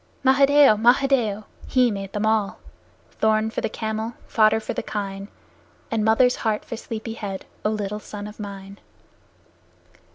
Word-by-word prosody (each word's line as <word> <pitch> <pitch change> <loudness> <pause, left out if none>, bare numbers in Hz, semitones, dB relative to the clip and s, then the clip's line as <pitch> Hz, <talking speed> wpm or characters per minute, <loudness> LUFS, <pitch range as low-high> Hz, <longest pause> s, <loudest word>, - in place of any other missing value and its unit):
Mahadeo! 275 -2 +6
Mahadeo! 240 -2 +3 0.2
He 250 -2 +3
made 195 -1 -5 0.2
all 215 -2 +1 0.6
Thorn 220 0 +2
for - - -3
the - - -1
camel, 220 +1 -3
fodder 220 0 +4
for 220 - -5
the - - -2
kine, 195 -1 -5 0.6
And 225 -2 0
mother's 235 +3 +4
heart 215 -2 -1
for - - -5
sleepy 225 0 -6
head, 200 -4 -6 0.2
O 210 - +2
little 210 -1 -3
son 205 -1 -8
of 210 +1 -10
mine! 200 -1 -8
220 Hz, 140 wpm, -23 LUFS, 205-230 Hz, 0.6 s, Mahadeo